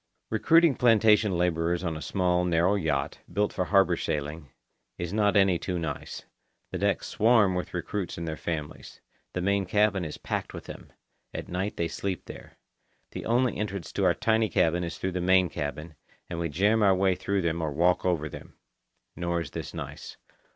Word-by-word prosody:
Recruiting 165 +7 +5
plantation 110 -5 +4
labourers 85 0 0
on 85 -3 -2
a 80 - -6
small, 90 -1 +1
narrow 90 +2 +2
yacht, 80 -8 -1
built 105 0 0
for 90 - -1
harbour 95 -2 +4
sailing, 75 0 -4 0.5
is 85 +1 -4
not 105 -1 +3
any 95 -3 +4
too 90 -2 -3
nice. 80 -2 -5 0.5
The - - -3
decks - - 0
swarm 110 -4 +3
with 90 0 -4
recruits 90 +1 -3
and 85 0 -4
their 80 - -3
families. 75 -2 -6 0.3
The 90 - -2
main 100 0 +1
cabin 105 -1 +2
is 75 -2 -5
packed - - -4
with - - -7
them. - - -11 0.4
At - - -5
night 95 +4 -3
they 85 - 0
sleep 90 +3 -4
there. - - -11 0.5
The - - -6
only 120 +2 +2
entrance 100 -5 -4
to - - -2
our - - +4
tiny 110 -1 +1
cabin 85 +2 +2
is 85 - -5
through 95 - -2
the 90 0 -2
main 95 0 +4
cabin, 75 +3 -5 0.4
and 85 - -3
we 85 -1 -1
jam 100 +9 +2
our 100 -2 +5
way 95 0 +3
through 100 +1 -1
them 85 0 -1
or 80 -2 -1
walk 85 +5 +2
over 85 -4 0
them. - - -11 0.6
Nor 85 -1 -1
is 80 - -7
this - - -6
nice. - - -8
90 Hz, 185 wpm, -27 LUFS, 85-100 Hz, 0.6 s, Recruiting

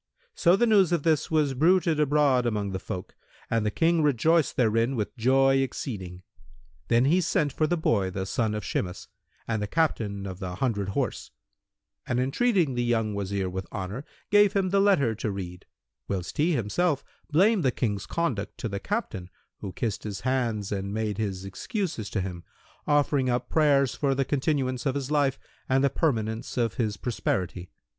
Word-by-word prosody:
So 175 - +4
the 240 - +3
news 200 -6 +4
of 170 -4 +1
this 160 -3 +2
was 150 -4 +2
bruited 165 +2 +3
abroad 145 -4 +3
among 105 -3 -1
the 95 - -3
folk 90 -1 -6 0.4
and 115 -1 +2
the 105 - +1
King 165 +8 +2
rejoiced 150 +2 +2
therein 115 +2 +2
with 105 -2 -3
joy 135 +3 +3
exceeding. 95 -9 -4 0.6
Then 120 +2 +3
he 170 +6 +3
sent 150 -4 0
for 155 - +1
the 175 - 0
boy, 100 - +1
the 95 +1 -4
son 110 +2 -1
of 105 - -4
Shimas, 90 -1 -3 0.4
and 110 -2 -1
the 105 - -2
Captain 105 -9 0
of 95 -1 -6
the 90 -2 -5
hundred 100 -4 -1
horse; 100 - -2 0.8
and, 120 - 0
entreating 165 - +2
the 120 0 -1
young 115 -3 0
Wazir 100 -1 -2
with 95 +1 -6
honour, 100 +7 -5 0.3
gave 205 -1 +5
him 195 -2 +1
the 200 - +3
letter 160 - +3
to 110 0 -3
read; 90 -3 -6 0.4
whilst 95 - -4
he 165 +4 +3
himself 140 - 0 0.3
blamed 190 +5 +3
the 130 - +4
King's 105 -5 -2
conduct 120 -13 -2
to - - -3
the 100 -2 -4
Captain 100 - -3 0.3
who 95 - -6
kissed 110 +2 -3
his 100 -2 -5
hands 120 -6 -1
and 100 -1 -3
made 110 -1 -2
his 95 -3 -3
excuses 135 - -4
to 100 - -1
him, 90 -2 -6 0.4
offering 145 -3 +2
up 125 0 -1
prayers 140 -5 +3
for 140 -2 0
the 135 0 0
continuance 135 -2 0
of 135 - 0
his 140 0 -3
life 140 -3 +2 0.3
and 130 +1 +3
the 140 - +3
permanence 115 -8 -1
of 115 -2 +1
his 110 -5 -1
prosperity. 95 -6 -2
125 Hz, 180 wpm, -27 LUFS, 100-150 Hz, 0.8 s, gave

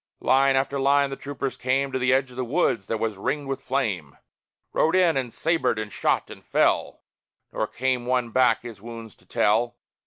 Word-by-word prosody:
Line 135 +1 +3
after 135 +1 0
line 140 +1 +3
the - - -3
troopers 135 -2 -4
came 135 +2 0
To 130 - -1
the 125 0 +2
edge 130 0 +2
of - - -13
the 130 - -2
wood 125 - +1
that 110 +3 -3
was 110 -2 -2
ringed 145 +8 -2
with 135 -1 -3
flame; 100 - -2 0.6
Rode 160 +3 +2
in, 180 -3 +4
and 130 -3 -2
sabred, 160 -7 +1
and 110 -2 -5
shot, - - 0
and - - -11
fell: - - +1 0.5
Nor - - -1
came 125 -1 -1
one 125 -2 0
back 130 0 +3
his 115 -4 -9
wounds 115 -1 -9
to - - -25
tell. 115 +3 +1
130 Hz, 195 wpm, -25 LUFS, 115-135 Hz, 0.6 s, in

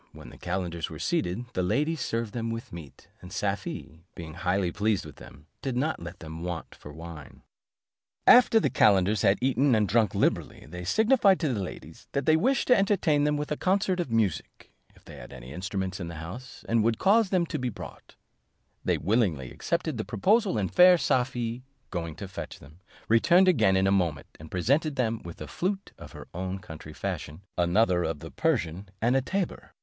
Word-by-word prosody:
When - - -11
the - - -14
calenders 85 -2 -3
were - - -8
seated, 90 +8 -1
the 90 - 0
ladies 145 - 0
served 115 -3 -2
them 115 -1 -3
with 115 -4 -6
meat; 80 -5 -11
and - - -11
Safie, 80 +2 -4
being 80 -2 -8
highly 90 +1 0
pleased 105 0 0
with - - -11
them, 70 +3 -14 0.2
did 130 -3 -2
not 150 - -1
let 85 +3 -9
them 80 0 -8
want 85 -2 -5
for 75 - -12
wine. 80 -1 -11 0.8
After 240 -2 +7
the - - 0
calenders 100 0 +4
had 100 - +4
eaten 130 0 +3
and 105 -2 +2
drunk 110 -1 +2
liberally, - - 0
they 90 0 -7
signified 220 - +4
to 150 -6 +1
the 105 - -2
ladies, 80 -3 -9
that 140 -1 -1
they 155 - +5
wished 260 +12 +1
to 250 - +8
entertain 185 -7 +2
them 150 0 +1
with 150 0 -4
a - - +1
concert 190 -1 +1
of 170 - -2
music, 110 -7 -2 0.2
if - - -23
they - - -11
had - - -11
any 65 +2 -10
instruments 95 +1 -3
in 85 - -5
the 85 - -7
house, 90 +11 -9
and 115 -1 +2
would 115 0 +1
cause 205 +2 +4
them 180 -3 +2
to - - -4
be 125 -1 -1
brought: 110 - -11 0.7
they - - +1
willingly 90 - 0
accepted 170 -5 -2
the - - -1
proposal, 195 - +2
and 95 -3 -2
fair 180 0 +8
Safie 125 -4 -1 0.3
going 85 -3 -4
to 100 - -7
fetch 95 - -7
them, 75 +5 -17 0.3
returned 170 +12 +5
again 95 - +4
in 95 - +2
a 95 - +3
moment, 85 -7 0
and 80 0 -11
presented 140 - +1
them 115 -3 -1
with 85 -1 -9
a - - -5
flute 195 +2 -3
of - - -11
her - - -10
own 95 +2 -3
country 80 -4 -10
fashion, 75 +1 -5
another 90 +1 +2
of 80 -2 -2
the - - -10
Persian, 85 +4 -1
and 120 +4 +2
a 135 - +3
tabor. 190 +7 -3
110 Hz, 200 wpm, -27 LUFS, 90-145 Hz, 0.8 s, to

